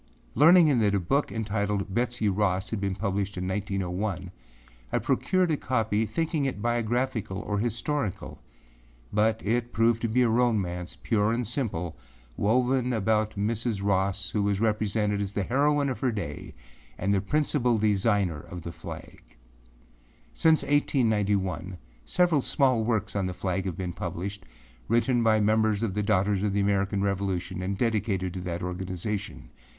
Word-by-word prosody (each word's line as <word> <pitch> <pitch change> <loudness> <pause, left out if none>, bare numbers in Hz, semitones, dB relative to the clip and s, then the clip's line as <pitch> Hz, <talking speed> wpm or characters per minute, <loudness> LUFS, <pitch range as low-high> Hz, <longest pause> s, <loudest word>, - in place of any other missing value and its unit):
Learning 155 -1 +6
that 105 -2 +2
a - - +2
book 135 - 0
entitled 105 -3 -2
âBetsey 120 -1 0
Rossâ 95 -1 0
had 110 -3 -2
been 100 -1 -1
published 100 -1 -2
in 90 0 -2
1901, 95 -1 -2 0.6
I - - +2
procured 185 -2 +1
a 150 - +1
copy 110 -4 0
thinking 160 -1 -1
it 130 -6 -2
biographical 120 -2 -1
or 105 -1 -2
historical 120 - -3 0.7
but 110 +1 +1
it 120 +3 0
proved 115 0 +2
to 115 - 0
be 125 +3 +2
a - - +3
romance, 105 -7 0
pure 110 -1 +2
and 120 +1 -1
simple, 100 - -3 0.4
woven 125 +3 +1
about 110 0 +1
Mrs. 110 0 -1
Ross 95 -1 0
who 100 -1 +1
is 100 -1 0
represented 105 -1 0
as 100 0 -3
the 100 - -1
heroine 145 +5 +2
of 130 - -3
her 130 - +1
day 100 -10 -6 0.4
and 100 +2 0
the 95 - +2
principal 125 0 +1
designer 100 -5 +1
of 85 +2 -9
the 85 - -5
flag. - - -9 1.1
Since 160 -1 +4
1891, 105 - +1 0.3
several 175 -5 +2
small 130 -4 +2
works 110 -2 -1
on 100 -2 0
the 90 - -5
flag 95 0 -2
have 90 -4 -3
been 90 -2 -3
published, 95 +1 -5 0.4
written 120 +2 +2
by 110 -1 +4
members 110 0 +2
of 105 -5 -1
the 105 - -1
Daughters 100 -1 +1
of 105 -1 0
the 100 - +1
American 100 0 +1
Revolution 95 -2 -2
and 95 +1 -2
dedicated 100 -5 0
to 95 - -5
that 85 -1 -4
organization. 95 +3 -4
105 Hz, 155 wpm, -27 LUFS, 95-120 Hz, 1.1 s, Learning